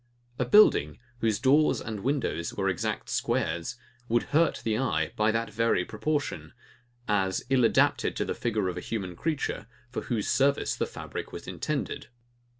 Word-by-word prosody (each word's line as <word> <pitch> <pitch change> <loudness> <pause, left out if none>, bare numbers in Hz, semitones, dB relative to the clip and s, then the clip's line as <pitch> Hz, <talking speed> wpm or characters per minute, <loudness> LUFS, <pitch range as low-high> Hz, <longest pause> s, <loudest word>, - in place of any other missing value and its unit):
A 125 - +2
building, 120 - +5 0.2
whose 110 -3 +1
doors 145 +5 +4
and 110 -2 -5
windows 120 - -1
were 95 -1 0
exact 90 - -2
squares, 85 +7 -1 0.3
would 120 +1 +2
hurt 160 +2 +3
the 110 -1 0
eye 95 -11 0
by 110 0 +2
that 115 0 -1
very 110 -4 +1
proportion; 110 - -3 0.5
as 95 -3 0
ill 130 -2 +4
adapted 115 - +3
to - - -1
the - - -2
figure 110 -5 -1
of 90 - -3
a - - -3
human 95 -6 -4
creature, 150 - -2 0.2
for - - -3
whose 115 -5 -2
service 140 +1 +2
the - - -1
fabric - - -7
was - - -8
intended. - - -3
110 Hz, 160 wpm, -28 LUFS, 95-130 Hz, 0.5 s, building